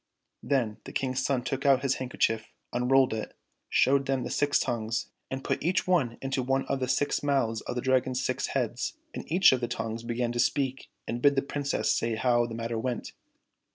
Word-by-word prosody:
Then 120 -7 0
the - - -7
King's 130 -1 -1
son 130 -3 0
took 135 +1 -3
out 135 -1 +4
his 135 -1 +2
handkerchief, 115 -3 0 0.3
unrolled 125 +1 +3
it, 110 -1 -5 0.3
showed 135 +1 +3
them 135 -2 0
the - - -4
six 145 0 +2
tongues, 115 -1 -2 0.2
and 135 0 -4
put - - -1
each 175 +4 +1
one 145 -11 +1
into 135 0 -1
one 135 +1 0
of 135 - -1
the 130 - -1
six 130 +3 +1
mouths 135 -6 +1
of - - -5
the 125 - -1
Dragon's 130 0 +1
six 130 0 -1
heads, 125 - -2 0.2
and - - -7
each 180 +3 +6
of 130 -1 +1
the 120 - 0
tongues 115 -1 -4
began 120 +1 -2
to 120 - -3
speak 135 +1 0 0.2
and 120 +1 -3
bid 140 +1 +5
the 135 - +1
Princess 140 0 0
say 115 -1 0
how 120 +1 +2
the 115 - -6
matter 115 0 -3
went. 120 0 -3
130 Hz, 205 wpm, -28 LUFS, 120-135 Hz, 0.3 s, each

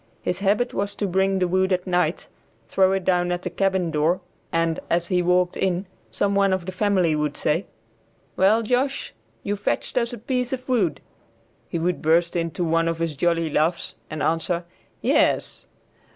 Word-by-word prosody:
His 180 - -1
habit 210 +5 +1
was 200 0 -2
to 205 - -2
bring 190 +1 +1
the 185 -1 +1
wood 185 +2 +1
at 180 -1 +1
night, 180 -1 0 0.4
throw 190 -1 +3
it 195 -1 -1
down 180 -1 +2
at 175 0 -2
the - - -3
cabin 190 -3 0
door, 160 +4 +2 0.3
and, 165 -1 +1
as 170 0 +1
he 180 -1 +2
walked 180 0 +2
in, 185 0 0 0.2
some 200 0 0
one 200 -1 +3
of 185 -2 -2
the 185 - -4
family 185 -4 +2
would 150 -1 -1
say, 165 +6 0 0.7
"Well, 215 +4 +4
Josh, 250 - -1 0.3
you 205 - -1
fetched 205 +4 -1
us 235 0 -1
a 240 - -6
piece 250 +2 -2
of 255 0 -5
wood." 210 - +1 0.7
He - - -2
would 175 +2 -1
burst 170 +2 +2
into 165 0 -1
one 165 0 +2
of 165 -1 -1
his 165 -2 -2
jolly 165 +1 +1
laughs 160 +4 0 0.2
and 155 0 -4
answer, 170 +2 0 0.4
"Yes." - - +1
180 Hz, 180 wpm, -23 LUFS, 165-200 Hz, 0.7 s, Well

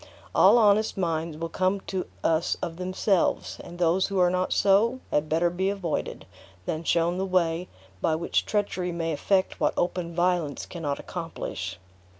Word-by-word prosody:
All - - +6
honest 215 -1 +3
minds 165 -3 -1
will 165 - -3
come 185 +4 0
to 190 -1 -4 0.2
us 165 +1 +1
of 165 -2 -4
themselves; 185 +1 0
and 175 0 -10
those 175 +2 +2
who 195 - -3
are 180 -1 +4
not 185 0 0
so, 215 +6 +3
had 150 +1 +1
better 170 +2 +2
be 190 +2 0
avoided, 195 -5 -3 0.4
than 160 +1 -3
shown 170 +2 +1
the - - 0
way 175 -1 +1 0.3
by 160 - +2
which 165 +2 0
treachery 195 -4 -1
may 165 -1 -2
effect 190 +5 +1
what - - +1
open 175 -1 -1
violence 175 -4 0
cannot 150 -5 -3
accomplish." 95 - -5
175 Hz, 160 wpm, -26 LUFS, 165-190 Hz, 0.4 s, All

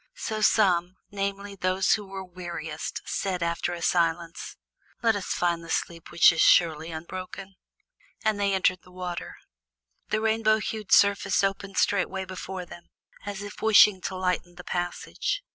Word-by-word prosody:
So 220 - -4
some, 185 -5 +3 0.2
namely, 200 0 -3
those 185 0 +1
who 210 -2 -2
were 190 0 -6
weariest, 175 -4 -6
said 185 -3 -2
after 170 +1 -1
a 170 - -7
silence: 170 -1 0 0.5
"Let 225 -2 +4
us 200 - -4
find 170 -1 0
the 165 - -11
sleep 165 0 -3
which 170 +2 +6
is 165 - 0
surely 160 -2 +4
unbroken." 185 +4 -7 0.7
And 215 -1 +2
they 200 -1 +2
entered 185 -1 +1
the - - -19
water. 180 -1 -6 0.7
The 215 - +1
rainbow 220 0 +2
hued 215 -1 -5
surface 200 -1 +4
opened 195 0 -2
straightway 190 -1 +1
before 185 0 -6
them, 175 0 -13 0.4
as 205 0 -5
if 205 0 -9
wishing 210 -3 +6
to 190 - -3
lighten 180 -1 -2
the 180 - -10
passage. 175 - -3
185 Hz, 155 wpm, -26 LUFS, 175-200 Hz, 0.7 s, which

